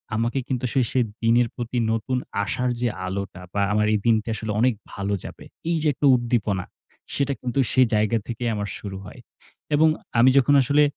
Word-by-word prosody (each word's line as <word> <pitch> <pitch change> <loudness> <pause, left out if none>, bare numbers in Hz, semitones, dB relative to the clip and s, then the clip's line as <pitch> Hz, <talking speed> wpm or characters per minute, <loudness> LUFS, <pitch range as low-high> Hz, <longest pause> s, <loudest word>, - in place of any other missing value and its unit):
আমাকে 115 +4 0
কিন্তু 130 -1 -2
সেই 130 -3 +3 0.4
দিনের 115 +1 +4
প্রতি 120 +1 -4
নতুন 115 +3 -1 0.3
আশার 125 +4 -1
যে 120 - +2 0.2
আলোটা 95 0 -5
বা 100 - 0
আমার 105 0 +2
এই 105 - +2
দিনটা 110 -1 +2
আসলে 110 -1 -4
অনেক 125 0 +3 0.2
ভালো 100 +1 -2
যাবে। - - -9 0.3
এই 170 - +2
যে - - +2
একটা 145 - -2
উদ্দীপনা, 115 -6 -1 0.5
সেটা 140 0 0
কিন্তু 125 +2 -2
সেই 130 -1 +5
জায়গা 110 +2 +2
থেকেই 120 0 -2
আমার 100 -1 -3
শুরু 100 -2 -6
হয়। - - -11 0.6
এবং 155 +2 +5 0.3
আমি 125 +3 +7
যখন 140 +2 +4
আসলে 145 +3 +3
120 Hz, 180 wpm, -24 LUFS, 105-130 Hz, 0.6 s, আমি